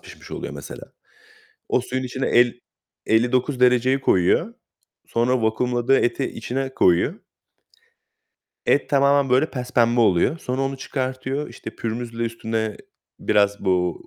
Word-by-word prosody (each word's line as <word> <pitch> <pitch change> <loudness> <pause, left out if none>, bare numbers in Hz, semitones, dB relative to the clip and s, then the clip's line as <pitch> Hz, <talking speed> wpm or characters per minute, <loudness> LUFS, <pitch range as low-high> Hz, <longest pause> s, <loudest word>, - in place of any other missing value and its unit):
pişmiş - - -14
oluyor - - -6
mesela. - - -10 0.8
O - - +2
suyun 130 +1 -3
içine 130 +1 -3
el 120 0 +3 0.5
elli 115 +2 +2
dokuz 130 +1 0
dereceyi 125 +2 +3
koyuyor. 135 - +2 0.5
Sonra 120 +1 0
vakumladığı 120 +3 +1
eti 125 +3 0
içine 130 +3 -4
koyuyor 90 - +2 1.5
et 145 - +2
tamamen, 140 -1 +3
böyle, 130 +5 +3
pespembe 120 -2 +1
oluyor. 110 - +3
Sonra 130 -2 -3
onu 135 0 -2
çıkartıyor. 130 +2 -3
İşte, - - -9
pürmüzle 115 0 -4
üstüne 110 -2 -3 0.4
biraz 100 -1 +1
bu, 90 -2 0
125 Hz, 125 wpm, -22 LUFS, 115-135 Hz, 1.5 s, el